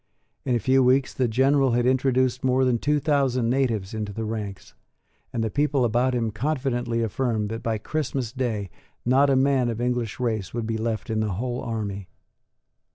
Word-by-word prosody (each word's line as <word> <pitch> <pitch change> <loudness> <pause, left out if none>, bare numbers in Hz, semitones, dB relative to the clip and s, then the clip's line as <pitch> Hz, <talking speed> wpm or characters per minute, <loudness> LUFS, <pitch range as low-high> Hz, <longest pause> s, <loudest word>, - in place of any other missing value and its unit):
In 125 - +1
a - - +2
few 130 +4 +3
weeks 130 +1 +3
the 130 - +1
General 135 +2 +3
had 120 0 +2
introduced 130 -1 +2
more 130 0 +3
than 125 -2 +2
two 150 +3 +1
thousand 135 -5 +1
natives 115 -7 0
into 105 -2 -3
the 110 +2 -4
ranks; 105 -3 -5 0.6
and 115 - -1
the 110 - -2
people 145 -3 +1
about 120 +3 +1
him 115 -2 0
confidently 120 -1 -1
affirmed 110 -1 -1
that 115 +1 -4
by 115 -1 -1
Christmas 135 -1 -3
day 110 -8 -2 0.3
not 135 +3 +4
a 135 - +4
man 130 -2 +3
of 115 -1 -3
English 120 -3 -1
race 110 -5 -2
would 120 -2 -2
be 110 0 -2
left 115 +1 -2
in 110 - 0
the 110 -3 -1
whole 120 +5 -3
army. 100 -4 -4
120 Hz, 185 wpm, -25 LUFS, 110-130 Hz, 0.6 s, not